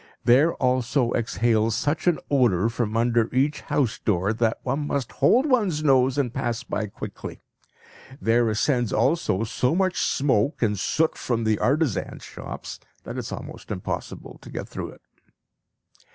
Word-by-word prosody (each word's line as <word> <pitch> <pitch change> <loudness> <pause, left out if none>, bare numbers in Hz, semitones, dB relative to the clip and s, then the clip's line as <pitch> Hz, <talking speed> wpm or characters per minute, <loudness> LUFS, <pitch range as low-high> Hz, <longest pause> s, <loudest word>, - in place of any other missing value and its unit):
There 140 +8 +4
also 125 0 +1
exhales 115 0 +1
such 145 +8 -1
an 175 - +4
odour 115 -7 +3
from 115 -2 -2
under 115 -1 +2
each 135 +4 +1
house 120 -6 0
door, 100 0 +1
that 115 0 0
one 140 +3 -1
must 140 -5 -2
hold 255 +4 +3
one's 210 - +1
nose 130 -2 +3
and 125 -4 0
pass 120 -3 -2
by 110 -2 -3
quickly. 100 - -8 0.8
There 115 -2 +2
ascends 120 +2 +1
also 130 - +1
so 125 +5 0
much 185 0 +1
smoke 135 -1 +1
and 105 -3 +1
soot 160 +10 +1
from 115 -2 -1
the 110 -1 +1
artisans' 140 - 0
shops - - -8 0.2
that - - -7
it - - -1
is - - -6
almost - - -8
impossible - - -5
to - - -12
get - - -5
through - - -6
it. - - -15
120 Hz, 155 wpm, -24 LUFS, 115-145 Hz, 0.8 s, There